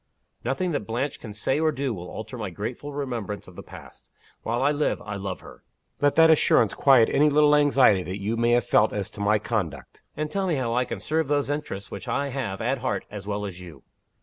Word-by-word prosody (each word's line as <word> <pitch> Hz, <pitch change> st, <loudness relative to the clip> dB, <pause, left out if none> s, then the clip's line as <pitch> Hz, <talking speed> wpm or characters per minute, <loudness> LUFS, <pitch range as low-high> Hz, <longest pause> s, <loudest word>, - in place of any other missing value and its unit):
Nothing 135 Hz, +9 st, -1 dB
that 110 Hz, -10 st, -3 dB
Blanche 125 Hz, +5 st, -2 dB
can 110 Hz, -, -8 dB
say 125 Hz, +7 st, -1 dB
or 160 Hz, 0 st, +2 dB
do 140 Hz, -3 st, -2 dB
will 90 Hz, -3 st, -8 dB
alter 110 Hz, +3 st, -7 dB
my 105 Hz, -5 st, -4 dB
grateful 115 Hz, +10 st, -6 dB
remembrance 120 Hz, -8 st, -4 dB
of 90 Hz, -, -14 dB
the -, -, -8 dB
past. -, -, -14 dB, 0.3 s
While 120 Hz, +3 st, -1 dB
I 145 Hz, -, +4 dB
live, 150 Hz, 0 st, 0 dB
I 105 Hz, -, -5 dB
love 95 Hz, -2 st, -5 dB
her. -, -, -14 dB, 0.4 s
Let 145 Hz, 0 st, +3 dB
that 160 Hz, 0 st, +7 dB
assurance 160 Hz, -, +4 dB
quiet 130 Hz, -5 st, +5 dB
any 150 Hz, +1 st, +4 dB
little 150 Hz, 0 st, +5 dB
anxiety 135 Hz, -9 st, +4 dB
that 95 Hz, +2 st, -5 dB
you 105 Hz, +4 st, -2 dB
may 120 Hz, +1 st, +2 dB
have 120 Hz, -1 st, +3 dB
felt 105 Hz, -, +3 dB
as 100 Hz, -2 st, -4 dB
to 105 Hz, -, -9 dB
my 105 Hz, +1 st, +3 dB
conduct 95 Hz, -, -4 dB, 0.2 s
and 150 Hz, 0 st, -3 dB
tell 195 Hz, +1 st, -1 dB
me 170 Hz, -, +1 dB
how 125 Hz, -4 st, -1 dB
I 125 Hz, +1 st, +1 dB
can -, -, -5 dB
serve 160 Hz, -1 st, -1 dB
those 145 Hz, 0 st, 0 dB
interests 100 Hz, -10 st, -5 dB
which 100 Hz, -1 st, -7 dB
I 140 Hz, 0 st, -1 dB
have 125 Hz, -8 st, -4 dB
at 125 Hz, +4 st, 0 dB
heart 130 Hz, -, -2 dB
as 100 Hz, -2 st, -8 dB
well 105 Hz, 0 st, -2 dB
as 90 Hz, -2 st, -7 dB
you." 85 Hz, -3 st, -12 dB
120 Hz, 230 wpm, -25 LUFS, 105-145 Hz, 0.4 s, that